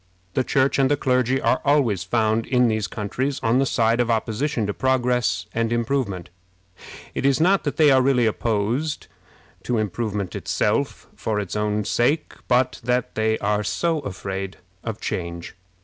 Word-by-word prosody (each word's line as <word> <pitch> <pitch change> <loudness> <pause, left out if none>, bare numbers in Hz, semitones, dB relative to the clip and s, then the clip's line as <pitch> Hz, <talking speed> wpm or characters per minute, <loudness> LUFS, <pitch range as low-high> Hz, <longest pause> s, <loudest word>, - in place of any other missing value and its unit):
The 130 - +1
Church 135 +2 +2
and 135 -1 +4
the 145 - +2
clergy 130 -1 +1
are - - +1
always 140 - +2
found 110 +2 +1
in 125 -2 +3
these 110 -2 -1
countries 125 +8 -3
on 115 +3 +3
the 135 - +2
side 115 -1 +2
of 120 -1 +1
opposition 115 +2 0
to 105 - -2
progress 125 -8 +1
and 115 0 0
improvement. 115 -7 -1 0.8
It - - -3
is 135 +1 +3
not 185 +3 +3
that 145 - -2
they 150 -3 +6
are 130 -1 +5
really 130 -2 +3
opposed 115 +7 -1 0.6
to 125 - -1
improvement 105 -2 -2
itself - - -1
for 105 -2 -2
its 100 -2 -4
own 105 0 0
sake, 140 +9 +1
but 125 +1 +2
that 125 0 0
they 110 0 +1
are 105 +1 0
so 130 - 0
afraid 95 -5 -5 0.3
of 110 -2 -4
change. 85 -1 -4
115 Hz, 165 wpm, -23 LUFS, 105-130 Hz, 0.8 s, they